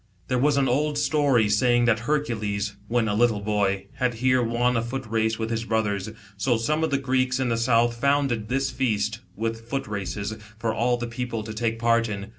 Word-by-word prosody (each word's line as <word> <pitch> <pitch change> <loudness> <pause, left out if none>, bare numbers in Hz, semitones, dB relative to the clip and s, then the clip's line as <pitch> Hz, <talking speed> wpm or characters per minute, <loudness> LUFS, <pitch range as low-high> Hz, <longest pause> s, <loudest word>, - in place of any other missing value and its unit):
There 125 - +1
was 145 +2 +3
an 135 -1 +3
old 145 +4 +1
story 145 -6 +3
saying 120 +3 +3
that 115 -2 +3
Hei'cules, 110 -7 -1
when 115 0 +1
a 105 - 0
little 110 -1 +2
boy, 100 -2 0
had 125 -2 0
here 130 +2 +2
won 120 +1 +1
a 115 - +2
foot 130 +3 -4
race 110 0 0
with 110 0 -3
his 115 0 -1
brothers, 110 -3 -1 0.3
so 120 +3 +1
some 155 +8 0
of 160 - +1
the 140 - +1
Greeks 130 -1 0
in 130 -2 0
the 115 - +1
south, 115 0 +2
founded 135 -5 +1
this 135 +1 0
feast, 110 -4 -1 0.2
with 115 +1 -4
foot 135 +1 -2
races, 100 +1 -4 0.2
for 110 0 -1
all 120 +1 +1
the 120 - -3
people 120 -1 -4
to 110 0 -6
take 115 0 -1
part 115 0 +2
in. 100 0 -5
115 Hz, 210 wpm, -25 LUFS, 110-130 Hz, 0.3 s, was